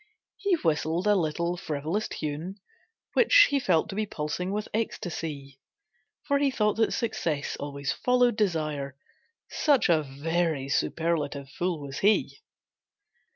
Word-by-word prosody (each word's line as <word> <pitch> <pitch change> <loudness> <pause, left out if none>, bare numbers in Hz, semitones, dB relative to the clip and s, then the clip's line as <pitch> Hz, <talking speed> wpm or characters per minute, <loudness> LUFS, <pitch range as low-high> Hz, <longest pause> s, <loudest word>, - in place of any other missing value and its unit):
He 400 -3 +2
whistled 165 - 0
a 210 - +5
little 170 0 0
frivolous 160 +4 -2
tune 155 +5 -4 0.6
Which - - +6
he 280 - +3
felt 180 -10 +2
to - - -5
be 215 0 -1
pulsing 165 +4 -3
with 210 +1 -2
ecstasy, 160 -10 -4 0.6
For 280 -1 +1
he 280 -1 +3
thought 210 -5 +1
that 225 - +2
success 165 -10 -2
always 140 -1 -3
followed 250 -2 +2
desire, 155 - -1 0.5
Such 285 -9 +3
a 160 -2 +4
very 150 0 -1
superlative 145 -2 -1
fool 175 +1 -2
was 140 -1 -6
he. 205 +2 +2
170 Hz, 130 wpm, -27 LUFS, 150-210 Hz, 0.6 s, Which